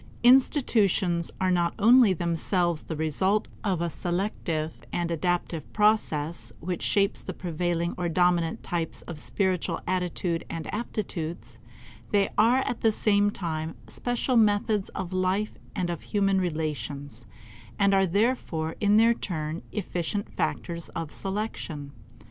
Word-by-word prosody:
Institutions 220 - +4
are 185 -1 +2
not 175 -1 +1
only 230 0 +7
themselves 170 -1 0
the 160 - -5
result 185 +7 +1 0.2
of 190 -5 0
a 170 - 0
selective 175 -4 -2 0.2
and 170 -1 -1
adaptive 175 -1 -1
process 175 -7 +1
which 175 +1 -3
shapes 200 0 +1
the 185 - -6
prevailing 170 0 -1
or 175 -1 0
dominant 175 -1 +2
types 170 -2 -3
of 165 -3 -8
spiritual 185 +1 -1
attitude 180 -2 -1
and 165 -2 -4
aptitudes; 170 - -4 0.5
they 200 -1 +3
are 240 +5 +4
at 245 -4 -3
the 225 - +4
same 205 -1 +3
time 160 -5 -3
special 245 +1 -1
methods 210 -1 +3
of 185 -1 -4
life 185 +3 +1 0.2
and 175 -1 -1
of 170 - -5
human 195 -2 +1
relations, 145 -7 -4 0.5
and 200 0 +4
are 195 -1 +4
therefore 180 -5 0
in 205 0 +4
their 230 +1 +6
turn 160 -7 -4
efficient 200 0 -3
factors 170 0 -2
of 165 -2 -4
selection. 190 -8 -4
180 Hz, 130 wpm, -27 LUFS, 165-205 Hz, 0.5 s, only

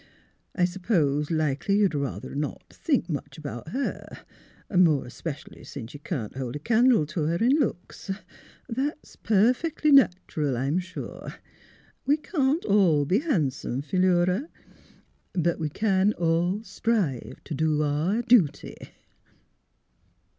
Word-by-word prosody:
" - - -42
I 180 - +3
s'pose 170 -6 0
likely 155 +3 0
you'd 200 -5 +3
ruther 140 -2 -4
not 145 +1 -5
think 275 - 0
much 155 0 -5
about 145 -4 -7
her, 265 +12 -5 0.5
more 165 -6 +4
especial 140 +4 -7
's - - -12 0.2
you 145 - -9
can't 130 - -5
hold 130 -1 -4
a - - -4
candle 230 - +3
t' 155 +4 -5
her 160 +3 0
in 230 +8 +2
looks. 200 - -3 0.6
That's 270 +5 -4
perfec'ly 250 +9 +2
natural, 175 - +3
I'm 140 +8 0
sure. 185 0 -7 0.7
We 290 +2 +4
can't 300 -1 0
all 180 -8 +4
be 190 +9 +2
han'some, 140 - -1
Philura; 180 - +1 0.8
but 170 -2 0
we 155 -2 -1
can 200 +3 +2
all 175 +5 0
strive 190 - -2
t' - - -6
do 155 0 +1
our 160 +10 0
dooty." 230 - +2
175 Hz, 125 wpm, -26 LUFS, 150-220 Hz, 0.8 s, more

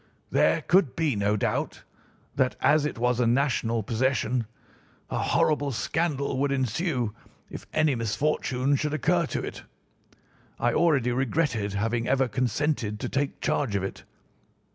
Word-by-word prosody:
There - - +3
could 180 -7 +3
be 155 -7 +1
no 105 +1 +1
doubt - - -2 0.5
that, 130 -1 +1
as 150 -1 +3
it 140 - -6
was 125 +1 +1
a 120 - +3
national 115 -3 +1
possession, 120 0 0 0.6
a - - -1
horrible 145 -2 +1
scandal 140 0 -1
would 140 0 +1
ensue 130 - -1 0.4
if - - -8
any 155 -2 +2
misfortune 130 +3 0
should 150 +2 -1
occur 170 +1 +1
to - - -3
it. - - -6 1.0
I 120 0 +2
already 145 -7 +3
regretted 120 -5 0
having 115 +3 -1
ever 135 0 +2
consented 125 -2 -1
to - - -3
take 140 0 -2
charge 130 -9 0
of 100 - 0
it. 95 - -6
130 Hz, 140 wpm, -26 LUFS, 115-145 Hz, 1.0 s, There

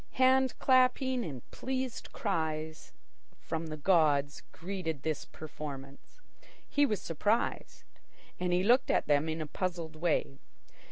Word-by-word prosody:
Hand 260 0 +4
clapping 255 -1 +3
and 135 - -7
pleased 260 -2 -4
cries 160 -5 -3 0.5
from 160 0 -4
the 155 0 -5
gods 150 -4 +3
greeted 165 -5 -4
the 155 -2 -2
performance. 145 - -9 0.5
He 290 0 +3
was 210 -6 -1
surprised, 205 +8 -1 0.6
and 180 0 0
looked 245 +4 +4
at - - +2
them 145 +2 +2
in 160 0 -2
a - - -2
puzzled 170 0 -3
way. 155 -4 0
165 Hz, 120 wpm, -31 LUFS, 155-240 Hz, 0.6 s, Hand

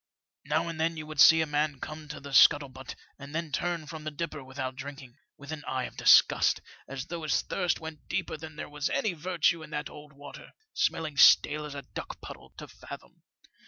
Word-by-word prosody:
Now 155 +4 0
and 165 -1 -4
then 165 0 0
you 155 - -6
would 155 -1 -8
see 160 0 +8
a - - +1
man 150 -2 -1
come 155 +2 -8
to 150 - -7
the 140 0 -10
sbuttle 140 0 +5
butt 130 +1 -9 0.2
and 140 +2 -9
then 165 -2 -3
turn 170 +2 -2
from 155 0 -8
the 155 - -3
dipper 155 -1 -5
without 130 0 -5
drinking, 135 -1 -10 0.2
with 140 +1 -10
an 155 -2 -6
eye 130 -1 -2
of - - -7
disgust, - - +5 0.3
as 135 -1 -6
though 170 -1 -6
his 155 - 0
thirst 175 -2 -1
went 160 -1 -9
deeper - - -2
than 155 0 -10
there - - -6
was 150 0 -3
any 215 - 0
virtue 170 0 0
in - - -10
that 150 0 -4
old 150 -1 -13
water, 140 0 -12 0.2
smelling 160 - -1
stale 150 +1 +6
as 145 -1 -8
a 140 - -6
duck - - -8
puddle, - - -11
to - - -8
fathom. - - -12
150 Hz, 215 wpm, -29 LUFS, 140-160 Hz, 0.3 s, see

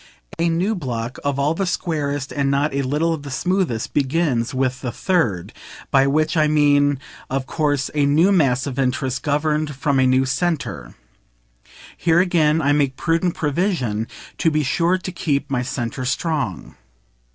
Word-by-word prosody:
A 170 0 +2
new 180 +6 +1
block, 125 - -4
all 140 +1 +1
of 165 - -4
the 195 - 0
squarest 145 -5 -2
and 140 -1 0
not 140 +2 +1
a 140 - 0
little 150 +5 0
of 160 - -5
the 140 - -8
smoothest, 165 - -1
begins 140 -4 +1
with 130 0 -1
the 125 - -3
Third 115 - 0 0.4
by 135 0 +4
which 155 +4 +1
I 155 -2 +3
mean 145 -1 +3 0.3
of 135 0 -2
course 145 -3 -1
a 145 -2 +2
new 160 +7 +4
mass 135 -9 +2
of 140 -2 -4
interest 130 0 -1
governed 150 0 0
from 135 +1 +1
a 130 - +4
new 130 +1 +3
centre. 135 - -2 1.0
Here 165 +1 +2
again 165 -3 +2
I 140 - +3
make 140 -3 +1
prudent 165 +1 0
PROVISION 145 - -1 0.3
to 165 - +3
be 155 -1 0
sure 170 +6 +1
to 185 0 -6
keep 145 -6 -2
my 125 -2 +1
centre 125 0 -4
strong. 135 - -2
145 Hz, 165 wpm, -21 LUFS, 130-165 Hz, 1.0 s, by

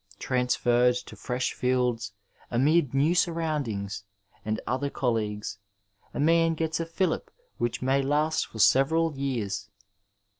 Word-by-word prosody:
Transferred 125 0 +2
to 125 - -7
fresh 125 -1 -2
fields, 125 -4 0 0.4
amid 140 +3 +3
new 145 +5 +3
surroundings 150 - -1 0.4
and 110 +1 -2
other 130 +4 -1
colleagues, 105 -6 -2 0.5
a - - -6
man 165 +2 +3
gets 160 0 -1
a 165 - -2
filUp 180 +3 -1 0.3
which 120 +1 -1
may 135 +1 +2
last 150 +3 +1
for - - -11
several 150 +7 +4
years. 110 -7 -3
130 Hz, 120 wpm, -27 LUFS, 120-155 Hz, 0.5 s, several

